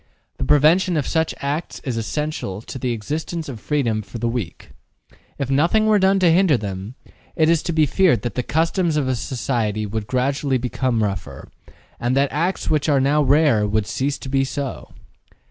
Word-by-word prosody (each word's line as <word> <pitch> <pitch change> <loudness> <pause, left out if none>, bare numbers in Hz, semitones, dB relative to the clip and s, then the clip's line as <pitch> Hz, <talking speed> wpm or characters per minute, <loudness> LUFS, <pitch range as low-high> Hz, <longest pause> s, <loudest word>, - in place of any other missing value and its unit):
The - - -2
prevention 165 +5 +4
of 145 - 0
such 160 -1 0
acts 145 +4 -3
is 130 -5 -3
essential 115 -4 -3
to 130 - -7
the 125 0 -1
existence 155 +8 -4
of 125 -6 -7
freedom 115 -5 0
for 105 +3 -9
the 120 +1 -1
weak. 115 -8 -5 0.7
If 135 -1 -3
nothing 170 +11 +3
were 215 -1 +4
done 190 +1 +3
to 175 -2 +5
hinder 170 -5 +4
them, 100 +2 -6 0.4
it 160 0 +3
is 165 -2 +3
to - - -3
be 155 -2 +3
feared 150 - +2
that 120 - -3
the 125 - -1
customs 165 +3 0
of 140 -3 0
a 130 - +1
society 115 -4 -2
would 105 0 -4
gradually 135 +1 0
become 125 -2 -1
rougher, 90 -9 -5 0.5
and 120 +2 0
that 140 0 +2
acts 170 +7 -1
which 155 0 +1
are 140 -2 +4
now 140 +3 +2
rare 140 -6 +3
would 105 0 0
cease 140 +5 -2
to - - -9
be 135 0 +2
so. 135 -1 -5
135 Hz, 190 wpm, -21 LUFS, 115-155 Hz, 0.7 s, to